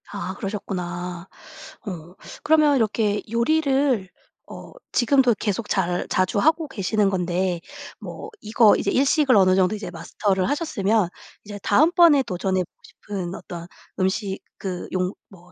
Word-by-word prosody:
아 200 -2 -5
그러셨구나. 180 -3 -5 0.6
어. 175 -2 -7 0.3
그러면 305 -2 +4
이렇게 215 -3 +1
요리를 265 -4 +1 0.4
어 - - -10 0.2
지금도 255 -1 +3
계속 210 0 -2
잘 180 -2 0
자주 185 +2 +1
하고 315 +5 +2
계시는 210 -3 0
건데 180 -1 -1 0.4
뭐 440 - -8
이거 215 0 +5
이제 - - -1
일식을 275 0 +3
어느 185 -1 +5
정도 190 +2 +2
이제 205 -3 -6
마스터를 190 +2 -1
하셨으면 225 - +1 0.4
이제 205 0 -8
다음번에 315 - +5
도전해 185 -2 -1
보고 - - -56
싶은 190 -3 -6
어떤 170 -1 -8 0.3
음식 190 +1 -1 0.2
그 185 -2 -5
용 185 +1 -1 0.2
뭐 180 -2 -18
200 Hz, 285 characters per minute, -23 LUFS, 185-250 Hz, 0.6 s, 이거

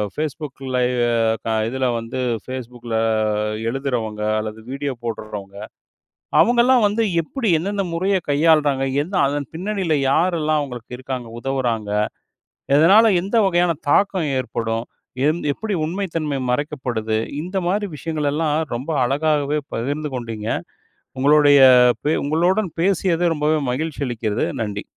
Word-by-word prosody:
Facebook 150 -2 -4 0.2
live, 125 -1 +1 0.4
க - - -4 0.2
இதுல 130 +1 -2
வந்து 115 +3 -6 0.3
Facebook 125 -2 -7
ல - - +1 0.8
எழுதுறவங்க, 120 -5 -3 0.2
அல்லது 110 0 -5
வீடியோ 140 +1 -3
போடுறவங்க, 105 -4 -6 0.8
அவுங்கலாம் 240 0 +4
வந்து 215 +3 +1 0.2
எப்புடி 230 - -3
எந்தெந்த 200 +4 -2
முறைய 190 +3 +1
கையாள்றாங்க? 145 -2 +3 0.2
எந்த 185 +4 -5
அதன் 145 -1 -3
பின்னணியில 185 -3 -1
யாரெல்லாம் 155 -1 +2
அவங்களுக்கு 125 -3 -7
இருக்காங்க! 130 -2 -5
உதவுறாங்க? 120 -5 -2 0.9
எதனால 195 +9 +6 0.2
எந்த 200 +5 -3
வகையான 175 -2 +2 0.2
தாக்கம் 190 -5 +2
ஏற்படும்? 115 -2 -3 0.4
எந் 155 +3 +1
எப்படி 215 +8 -4
உண்மை 190 +5 -2
தன்மை 150 -4 -1
மறைக்கப்படுது? 125 -5 -1 0.2
இந்த 185 +4 -4
மாரி 205 +3 0
விஷயங்களெல்லாம் 150 0 -1 0.2
ரொம்ப 130 +7 -4
அழகாகவே 145 +2 +1 0.2
பகிர்ந்து 145 +5 -3
கொண்டீங்க. 115 -3 -5 0.7
உங்களுடைய 145 0 +6 0.4
பே 150 - +2
உங்களுடன் 175 +7 +1
பேசியது 175 -2 +2
ரொம்பவே 155 +1 +1
மகிழ்ச்சி 150 +3 -3
அளிக்கிறது. 110 -3 -1 0.2
நன்றி. 105 -2 -3
145 Hz, 120 wpm, -21 LUFS, 125-170 Hz, 0.9 s, எதனால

